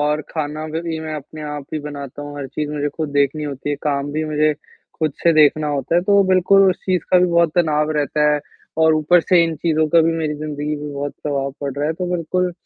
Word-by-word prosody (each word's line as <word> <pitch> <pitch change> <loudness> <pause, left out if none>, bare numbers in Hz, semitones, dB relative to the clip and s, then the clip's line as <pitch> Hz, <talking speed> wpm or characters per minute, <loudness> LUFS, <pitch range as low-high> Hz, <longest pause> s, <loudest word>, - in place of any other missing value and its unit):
और 150 +1 +1
खाना 155 0 -4
भ 160 +1 -3
भी 165 -1 -3
मैं 155 -1 -5
अपने 155 +1 -8
आप 150 -2 -5
ही 155 - -1
बनाता 145 -1 -7
हूँ, 145 0 -8
हर 140 - -4
चीज़ 150 +1 -4
मुझे 145 -1 -1
खुद 155 -2 -2
देखनी 145 +1 +1
होती 145 0 -4
है, 145 - -1
काम 145 -1 -1
भी 155 +1 -1
मुझे 155 0 +2 0.5
खुद 155 -2 0
से 170 - +5
देखना 155 0 +4
होता 140 +1 -1
है, 175 - +5
तो 200 +1 +4
बिल्कुल 190 +1 +5
उस 180 - -2
चीज़ 185 -3 +1
का 180 - +6
भी 180 - +4
बहुत 170 -1 +3
तनाव 155 -3 +2
रहता 150 +1 +2
है। 150 - 0 0.4
और 160 0 +5
ऊपर 155 +3 +4
से 175 +1 +4
इन 165 -1 -2
चीज़ों 160 0 +1
का 165 +2 +5
भी 165 +1 +2
मेरी 155 -2 -2
ज़िंदगी 150 0 -4
में 145 0 -6
बहुत 140 0 -4
प्रभाव 140 -2 -1
पड़ 140 -1 -3
रहा 145 +1 -1
है, 160 - 0
तो 180 +3 -4
बिल्कुल 180 +1 -1
155 Hz, 245 wpm, -20 LUFS, 145-165 Hz, 0.5 s, का